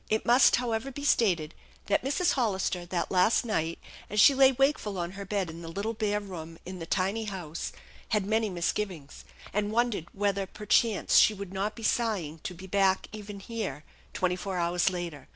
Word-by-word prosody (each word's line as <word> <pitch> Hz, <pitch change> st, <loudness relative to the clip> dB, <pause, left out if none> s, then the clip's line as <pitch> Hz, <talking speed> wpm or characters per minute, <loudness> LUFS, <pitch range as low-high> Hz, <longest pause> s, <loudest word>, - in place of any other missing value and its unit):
It 220 Hz, 0 st, 0 dB
must, 245 Hz, +3 st, +6 dB
however, 235 Hz, +1 st, -1 dB
be 285 Hz, +2 st, -7 dB
stated 175 Hz, -, +2 dB, 0.3 s
that 205 Hz, -, +2 dB
Mrs. 315 Hz, +7 st, +1 dB
Hollister, 190 Hz, -7 st, -1 dB
that 175 Hz, -1 st, -2 dB
last 190 Hz, +6 st, +3 dB
night, 165 Hz, -7 st, -1 dB, 0.3 s
as 210 Hz, -, -1 dB
she 275 Hz, -, +8 dB
lay 270 Hz, 0 st, +6 dB
wakeful 270 Hz, -6 st, +1 dB
on 170 Hz, 0 st, -3 dB
her 200 Hz, +1 st, -7 dB
bed 195 Hz, -2 st, -1 dB
in 165 Hz, +1 st, -8 dB
the 165 Hz, -, -8 dB
little 200 Hz, +7 st, -3 dB
bare 210 Hz, -1 st, 0 dB
room 165 Hz, -5 st, -8 dB
in 185 Hz, 0 st, -7 dB
the 165 Hz, -, -6 dB
tiny 195 Hz, +5 st, 0 dB
house, 175 Hz, -6 st, -5 dB, 0.4 s
had 210 Hz, -3 st, +1 dB
many 220 Hz, +1 st, +1 dB
misgivings, 175 Hz, -3 st, -3 dB, 0.3 s
and 205 Hz, +1 st, 0 dB
wondered 230 Hz, -7 st, 0 dB
whether 200 Hz, -1 st, -1 dB
per 210 Hz, +3 st, -10 dB
chance 220 Hz, 0 st, +3 dB
she 215 Hz, -, +6 dB
would 195 Hz, -2 st, -7 dB
not 200 Hz, +3 st, -2 dB
be 230 Hz, -, -9 dB
sighing 200 Hz, -10 st, 0 dB
to 180 Hz, -, -6 dB
be 185 Hz, +3 st, -10 dB
back 190 Hz, 0 st, +2 dB
even 205 Hz, -1 st, -8 dB
here 195 Hz, -, -5 dB, 0.3 s
twenty 180 Hz, -1 st, 0 dB
four 185 Hz, 0 st, -4 dB
hours 175 Hz, +1 st, +2 dB
later. 175 Hz, -5 st, -6 dB
200 Hz, 190 wpm, -28 LUFS, 175-220 Hz, 0.4 s, she